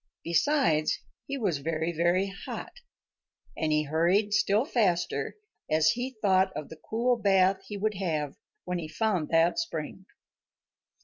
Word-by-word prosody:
Besides, 170 - +2 0.3
he 280 - -3
was 190 - 0
very, 160 +3 -1
very 175 +3 +2 0.2
hot, - - -5 0.8
and 155 -1 -1
he 150 0 +3
hurried 175 +8 +2
still 215 +3 +3
faster 200 - 0 0.3
as 155 0 +4
he 250 +2 -4
thought 190 -1 +4
of 150 - -6
the 160 -1 -12
cool 240 +2 +2
bath 195 -2 +3
he 205 - -5
would 215 +2 0
have 155 -7 -2 0.3
when 180 0 -2
he 160 - -5
found 175 0 -1
that 165 - +3
spring. 335 - -5
185 Hz, 140 wpm, -28 LUFS, 160-215 Hz, 0.8 s, as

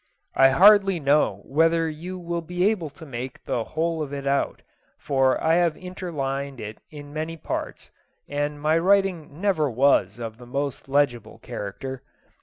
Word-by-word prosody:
I 135 - +6
hardly 195 +4 +6
know 140 -9 +2
whether 165 +3 +2
you 170 +4 -6
will 170 -1 -3
be 180 +2 -1
able 190 -8 0
to 160 +3 -13
make 130 -2 -7
the 115 - -1
whole 160 +4 -2
of 145 -2 -4
it 140 -1 -5
out, 140 0 0 0.3
for 135 -2 +1
I 160 - +2
have 170 -3 +2
interlined 140 -7 -4
it 105 +1 -7
in 145 -1 -10
many 160 +2 -4
parts, - - -5 0.4
and 145 0 -2
my 155 +2 +2
writing 180 -5 +1
never 180 -7 +1
was 120 -5 +3
of 115 -1 -7
the 120 - -12
most 140 +1 -3
legible 135 -5 0
character. 130 +6 -6
150 Hz, 160 wpm, -24 LUFS, 135-170 Hz, 0.4 s, I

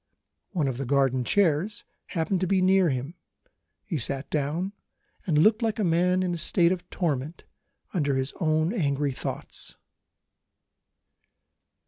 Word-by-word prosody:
One 165 -8 0
of 130 -2 -3
the 135 - -2
garden 135 -2 +2
chairs 185 - +1 0.2
happened 175 +1 -1
to 185 - +1
be 190 +1 +2
near 185 -1 +4
him; 135 +3 -3 0.7
he 165 -6 -3
sat 135 +3 -2
down, 155 +7 -1 0.5
and 160 -4 +2
looked 215 +9 +4
like 225 -2 0
a 215 - 0
man 180 +2 +2
in 180 -1 -1
a - - -2
state 170 +1 +3
of 185 -2 -4
torment 155 -2 -2 0.5
under 145 -7 +1
his 130 +1 -1
own 155 +2 +1
angry 145 - 0
thoughts. 130 - -6
165 Hz, 140 wpm, -26 LUFS, 140-185 Hz, 0.7 s, near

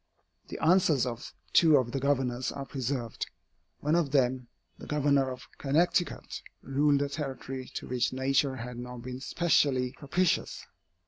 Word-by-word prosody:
The - - -6
answers 160 -6 +4
of 120 +1 -5 0.2
two 160 -3 +7
of 125 -3 0
the 135 - -1
Governors 130 -2 0
are 140 -1 -6
preserved. 130 -3 -3 0.5
One 150 +2 +1
of 170 -4 +2
them, 130 -2 +1 0.3
the - - -10
Governor 140 -2 +2
of 130 0 -8
Connecticut, 170 +5 0 0.2
ruled 140 +1 +2
a - - -1
territory 135 -3 -5
to - - -5
which 125 -1 0
nature 135 +1 +1
had 120 0 -6
not 125 -1 -7
been 125 0 -6
specially 135 -4 +2
propitious. 165 +6 -1
135 Hz, 145 wpm, -29 LUFS, 125-145 Hz, 0.5 s, two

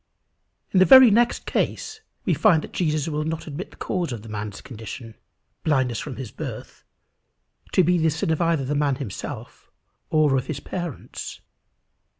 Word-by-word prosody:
In 190 - +4
the 185 - +7
very 260 -1 +9
next 240 +3 +2
case 440 0 -2 0.2
we - - +2
find 160 -2 +4
that - - -9
Jesus 155 -3 0
will 150 -1 -1
not 160 +1 -3
admit 160 +5 -6
the - - -18
cause 175 -6 -2
of 115 -4 -6
the 115 - -10
man's 105 -1 -5
condition, 115 0 -9 0.5
blindness 130 -6 +1
from 140 -4 -6
his 125 -6 -7
birth, - - -8 0.9
to 185 - +5
be 175 +1 +3
the 160 0 +3
sin 160 +1 -1
either 165 -4 +2
of - - -5
the 145 - 0
man 145 -2 +1
himself, 125 -8 -7 0.4
or 155 -3 +3
of 130 - -1
his 150 -3 -3
parents. 175 -3 -6
150 Hz, 170 wpm, -24 LUFS, 130-175 Hz, 0.9 s, very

